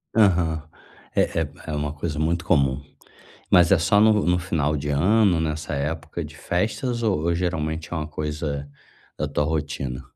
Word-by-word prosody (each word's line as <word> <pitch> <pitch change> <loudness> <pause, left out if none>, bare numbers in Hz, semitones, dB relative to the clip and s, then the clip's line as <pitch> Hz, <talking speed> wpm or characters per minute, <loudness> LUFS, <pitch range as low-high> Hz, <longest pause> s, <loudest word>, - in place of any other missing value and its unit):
Aham, 85 -7 +3 0.5
eh - - +4
eh, 80 - -1 0.2
é - - -5
uma 75 0 -2
coisa 75 0 -4
muito 85 +2 0
comum, 70 -6 +2 0.7
mas 90 -1 +5
é 95 - +6
só 100 +5 +3
no 105 -1 +5
no 90 0 +3
final 75 -4 0
de 75 0 -4
ano, 90 +5 +3
nessa 75 -1 -2
época 75 +3 -3
de - - -10
festas 120 +6 -1
ou 100 -8 +1
ou 85 +2 +1
geralmente 80 -2 -2
é - - -1
uma 75 -1 -3
coisa 75 -2 -4 0.5
da - - -2
tua 75 - 0
rotina? 75 -4 -3
80 Hz, 170 wpm, -24 LUFS, 75-90 Hz, 0.7 s, é